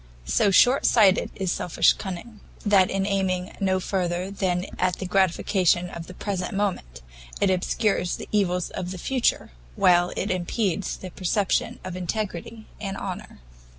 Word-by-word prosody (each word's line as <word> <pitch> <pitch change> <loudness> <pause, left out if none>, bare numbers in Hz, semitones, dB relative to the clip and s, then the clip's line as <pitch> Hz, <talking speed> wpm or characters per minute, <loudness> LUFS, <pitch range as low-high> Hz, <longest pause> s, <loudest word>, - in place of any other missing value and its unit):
So 60 - +3
short 245 +7 +5
sighted 205 -4 +4
is 190 -3 -1
selfish 180 - +3
cunning, 205 +3 -7 0.3
that 200 -3 +5
in 195 0 -1
aiming 190 -2 -1
no 190 -1 +1
further 180 0 -2
than 185 -2 -1
at 180 -1 +1
the 190 - -5
gratification 180 -1 +2
of 165 -1 -8
the 185 - -10
present 185 -3 -3
moment, 120 - -2 0.4
it 200 - +3
obscures 185 0 0
the - - -8
evils 180 -4 0
of 180 -1 -4
the 185 - -6
future, 255 - 0 0.2
while 175 - +4
it 200 - -1
impedes 185 +1 -1
the 185 - -8
perception 190 +2 0
of 185 -1 -6
integrity 210 +3 -4
and 195 -2 -4
honour. 195 - -7
185 Hz, 150 wpm, -25 LUFS, 180-200 Hz, 0.4 s, short